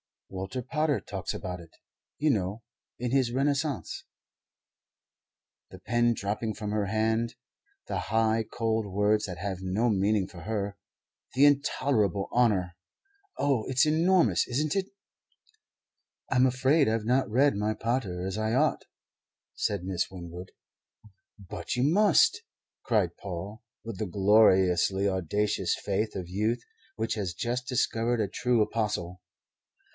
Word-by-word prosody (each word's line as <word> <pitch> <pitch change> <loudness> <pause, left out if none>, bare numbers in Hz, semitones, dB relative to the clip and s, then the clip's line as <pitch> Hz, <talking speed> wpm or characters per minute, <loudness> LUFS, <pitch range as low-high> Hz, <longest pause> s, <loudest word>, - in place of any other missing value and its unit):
Walter 95 +7 -5
Pater 150 +3 0
talks - - -5
about 90 -1 -5
it 85 -1 -15 0.4
you 150 0 +2
know 105 0 -2 0.3
in 125 0 -3
his 130 -3 +2
'Renaissance' 140 +2 -1 1.6
the 95 - -11
pen 120 +5 +1
dropping 105 +2 -3
from 105 -2 -4
her 105 -1 0
hand 110 +3 0 0.5
'the - - -2
high, 110 0 +1
cold 110 -2 -1
words 105 +2 +1
that 90 -3 -6
have 95 0 -4
no 95 +6 0
meaning 100 -1 +1
for 85 - -12
her 100 0 -3 0.6
the 135 +3 +6
intolerable 130 -8 +2
honour'! 95 -8 +2 0.6
Oh, 135 -6 +1
it's 130 +2 +3
enormous, 160 - +3
isn't 145 +6 -1
it?" 195 -1 0 1.4
"I'm 130 0 +5
afraid 130 +4 +3
I've 110 0 0
not 125 +2 +2
read 135 +4 +3
my 105 +1 -1
Pater 110 -7 -2
as 95 +2 -3
I 110 +1 -1
ought," 150 +5 +1 0.7
said 100 -4 -2
Miss 95 -1 -2
Winwood. 90 0 -9 0.9
"But, 90 -2 -5
you 125 - +1
must!" 185 +5 +4 0.4
cried - - +1
Paul, 100 +3 -7 0.2
with 115 -5 -7
the 110 - -2
gloriously 95 -1 +4
audacious 95 +1 0
faith 105 +2 -2
of 90 -2 -4
youth 110 +5 -1 0.3
which 110 - -1
has 95 -6 -3
just 125 +5 -2
discovered 120 -2 0
a 100 - -1
true 120 -3 +2
apostle. 105 -5 -3
110 Hz, 130 wpm, -28 LUFS, 95-125 Hz, 1.6 s, the